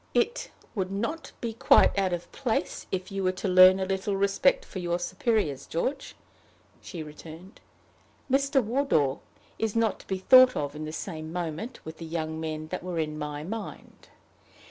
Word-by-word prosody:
"It - - +1 0.2
would 190 -3 -2
not 235 +12 -3
be 230 -2 -3
quite 225 - +5
out 195 -2 +1
of 175 -1 -4
place 235 -9 -2
if 185 0 -3
you 195 0 -2
were 185 - +2
to 185 +2 -4
learn 185 +1 +7
a 190 - 0
little 195 +1 -1
respect 340 - +2
for 190 - -7
your 175 -1 -1
superiors, 180 - -1
George," 270 - -3 0.7
she 170 -5 -7
returned. 160 +5 -12 0.7
"Mr. 275 0 +2
Wardour 215 - +1 0.4
is 225 -1 -1
not 230 -2 +1
to - - -16
be 190 - -1
thought 255 +6 +7
of 145 0 -3
in 155 +1 -5
the 155 - -5
same 155 0 -6
moment 175 +7 -5
with 160 0 -8
the 165 - -6
young 160 -1 -3
men 155 -1 -4
that 185 - -4
were 180 -1 -5
in 155 -1 -2
my 150 0 -4
mind. 215 +6 -8
185 Hz, 175 wpm, -27 LUFS, 160-225 Hz, 0.7 s, learn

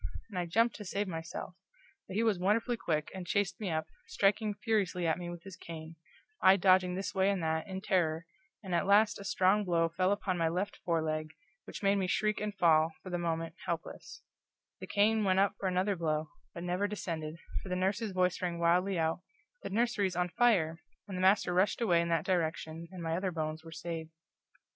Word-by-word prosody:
and 185 - -3
I 175 - -2
jumped 230 +7 +2
to 210 - -7
save 200 +1 -2
myself; 165 +1 -6 0.5
but 190 - -7
he 220 - +2
was 215 -5 +2
furiously 220 +6 +1
quick, 155 -8 -1
and 185 -2 -7
chased 200 +1 0
me 205 -4 -3
up, 160 -1 -1 0.2
striking 210 +1 +1
furiously 200 -5 0
at 165 +1 +1
me 175 -1 -5
with 175 -1 -8
his 195 -3 -9
cane, 165 -2 -9 0.5
I 190 +1 +7
dodging 185 -1 +4
this 190 -1 -3
way 190 0 +3
and 195 -4 0
that, 160 +2 -1
in 190 -1 -5
terror, 170 -5 +1 0.4
and 185 -2 -5
at 175 +3 +1
last 205 +2 +4
a - - -7
strong 200 +1 +3
blow 170 -3 +2
fell 185 +3 +1
upon 195 -3 -1
my 165 - +2
left 185 +5 -2
foreleg, 160 -2 -2 0.3
which - - -8
made 200 0 +4
me 190 -2 0
shriek 215 +3 0
and 210 -1 -3
fall, 160 -2 +4
for 185 - -7
the 175 - -1
moment, 165 -1 -2
helpless; 170 - -5 0.6
the - - -7
cane 215 +1 +3
went 190 -2 +2
up 195 +1 +3
for 195 - -1
another 185 +2 +1
blow, 155 -2 -1 0.2
but 170 - -7
never 180 +3 0
descended, 165 -6 -4 0.2
for 190 - -9
the 180 - 0
nurse's 195 +4 0
voice 185 -1 +1
rang 175 -2 -2
wildly 180 +3 +2
out, 160 +1 0 0.4
"The - - -5
nursery's 205 -4 +1
on 180 0 0
fire!" 175 -8 +2 0.3
and 195 - -6
the 185 - -2
master 190 -1 +4
rushed 185 +3 +2
away 175 -8 +3
in 170 - -2
that 165 -2 +1
direction, 165 -2 -1
and 180 -2 -7
my 165 0 -1
other 185 +2 -1
bones 155 -2 -4
were 165 - -11
saved. 165 0 -5
180 Hz, 210 wpm, -32 LUFS, 165-200 Hz, 0.6 s, I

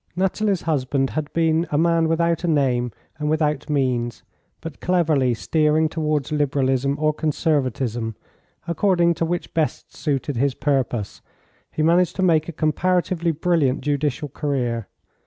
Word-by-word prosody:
Nathalie's 190 +1 0
husband 135 -3 0
had 155 -2 -3
been 165 0 +1
a 145 - 0
man 165 0 +3
without 170 +1 +1
a - - 0
name 130 -6 +1 0.3
and 150 0 -1
without 150 -2 0
means, 125 -5 -1 0.4
but 165 -3 -8
cleverly 155 -9 +2
steering 155 +6 +2
towards 155 -3 -1
Liberalism 140 -2 +1
or 155 0 +2
Conservatism, 130 -7 -1 0.5
according 170 0 +2
to 165 - -1
which 175 +1 -3
best 160 -2 -2
suited 140 -2 -2
his 135 +1 +1
purpose, 130 -7 -1 0.5
he 155 - -1
managed 170 +2 +3
to 190 - -1
make 160 -3 +3
a - - -2
comparatively 170 +2 0
brilliant 155 -4 +1
judicial 145 +1 -1
career. 125 -6 -2
150 Hz, 140 wpm, -22 LUFS, 135-165 Hz, 0.5 s, man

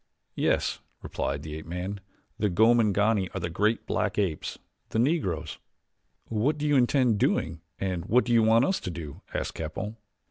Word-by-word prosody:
"Yes," - - +1 0.2
replied 70 +1 -3
the 75 - -6
ape 80 - -9
man, 90 +4 -4 0.4
"the 105 - +2
Gomangani 105 -1 +3
are - - -1
the 85 -1 -3
great 105 +6 +1
black - - -1
apes 95 -7 -1 0.3
the - - -2
Negroes." 105 - 0 0.7
"What 120 +8 0
do 150 - -2
you 145 - +3
intend 125 -3 +3
doing 80 -3 0 0.2
and 90 -2 -2
what 120 +4 +4
do 120 - +1
you 115 - +6
want 115 +3 +5
us 190 - +1
to - - -5
do?" 85 -5 -7
asked - - -3
Capell. 80 +8 -5
105 Hz, 170 wpm, -27 LUFS, 85-115 Hz, 0.7 s, you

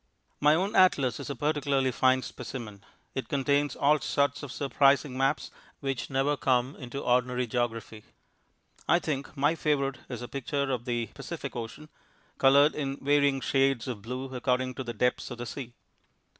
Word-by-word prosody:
My 150 +1 +5
own 195 +5 -1
atlas 135 - +4
is - - -6
a 140 - -3
particularly 140 -3 +1
fine 130 +1 +3
specimen. 110 -6 -7 0.3
It 130 - -4
contains 140 0 +1
all 150 +2 +3
sorts 140 -1 0
of 145 -4 -7
surprising 140 -1 +2
maps 135 +3 0 0.3
which 135 -2 -3
never 135 +2 +1
come 130 0 +1
into 135 +1 -6
ordinary 125 0 +1
geography. 115 -2 -3 0.8
I 170 - +6
think 150 -3 -4
my 145 +3 +3
favourite 140 -4 0
is 125 -2 -5
a - - -5
picture 140 +1 -2
of 120 -2 -2
the 120 -3 -2
Pacific - - -6
Ocean, 120 +6 -6 0.5
coloured 140 +3 +6
in 140 -2 -3
varying 140 -1 +2
shades 135 -2 +1
of 120 -5 -4
blue 130 +4 -5
according 125 0 0
to 130 - -5
the 120 -1 -5
depths 125 +3 0
of 125 - -7
the 120 - -5
sea. 125 0 -6
135 Hz, 165 wpm, -28 LUFS, 125-140 Hz, 0.8 s, I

